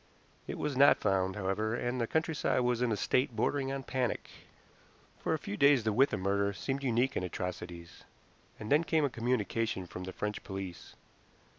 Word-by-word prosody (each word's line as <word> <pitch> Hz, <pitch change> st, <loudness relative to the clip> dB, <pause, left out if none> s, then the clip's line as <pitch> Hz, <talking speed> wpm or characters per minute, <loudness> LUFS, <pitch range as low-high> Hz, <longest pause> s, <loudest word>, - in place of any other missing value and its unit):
It -, -, -4 dB
was 145 Hz, -2 st, -2 dB
not 140 Hz, +2 st, +7 dB
found, 95 Hz, -1 st, +1 dB
however, 105 Hz, +3 st, -1 dB
and 120 Hz, +1 st, -2 dB
the 115 Hz, -, 0 dB
countryside 160 Hz, -3 st, +1 dB
was 125 Hz, -1 st, +1 dB
in 125 Hz, -2 st, +2 dB
a 105 Hz, -, 0 dB
state 125 Hz, +1 st, +1 dB
bordering 135 Hz, +4 st, 0 dB
on 135 Hz, 0 st, -3 dB
panic. 125 Hz, -2 st, -2 dB, 0.9 s
For -, -, 0 dB
a -, -, -2 dB
few 100 Hz, -, -5 dB
days 140 Hz, 0 st, +5 dB
the 110 Hz, -1 st, +1 dB
Withan 130 Hz, -4 st, +3 dB
murder 100 Hz, +1 st, +1 dB
seemed 135 Hz, +7 st, -3 dB
unique 130 Hz, 0 st, +1 dB
in -, -, 0 dB
atrocities, 90 Hz, -1 st, -6 dB, 0.6 s
and 105 Hz, -, -6 dB
then 150 Hz, +3 st, +5 dB
came 160 Hz, -2 st, +2 dB
a 140 Hz, -, -1 dB
communication 115 Hz, -4 st, -1 dB
from 90 Hz, +1 st, -7 dB
the 95 Hz, -, -5 dB
French 105 Hz, +2 st, -4 dB
police. 95 Hz, -4 st, -7 dB
115 Hz, 180 wpm, -32 LUFS, 95-135 Hz, 0.9 s, not